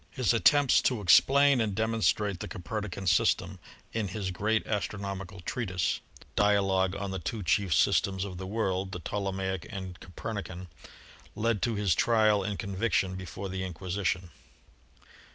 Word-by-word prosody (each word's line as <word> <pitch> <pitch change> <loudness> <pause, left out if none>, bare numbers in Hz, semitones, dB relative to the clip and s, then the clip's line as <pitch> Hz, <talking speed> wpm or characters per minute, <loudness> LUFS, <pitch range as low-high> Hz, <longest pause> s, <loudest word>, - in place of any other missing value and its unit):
His 125 -2 +1
attempts 140 +4 +5
to 125 -4 -3
explain 135 +8 +5
and 105 -3 -1
demonstrate 110 -3 +1
the - - -5
Copernican 100 +1 -5
system 85 -2 +2 0.3
in 110 -3 -1
his 95 0 -3
great 110 +4 0
astronomi 100 -2 -3
cal 90 +1 -12
treatise, 95 -2 -1 0.4
"Dialog 95 -2 +2
on 100 -1 -4
the 95 - -3
Two 110 -4 -4
Chief 90 +3 +1
Systems 95 +4 +2
of 90 -3 -7
the 95 - -5
World, 95 -3 -1
the 90 - -4
Ptolemaic 95 +1 -3
and 95 -4 -7
Copernican," 95 -1 -6 0.7
led 115 -1 0
to 115 -2 0
his 100 -4 +2
trial 110 -1 +3
and 100 +1 -3
conviction 95 -3 0
before 95 +1 -6
the 95 0 -4
Inquisition. 95 0 -3
100 Hz, 145 wpm, -29 LUFS, 95-110 Hz, 0.7 s, attempts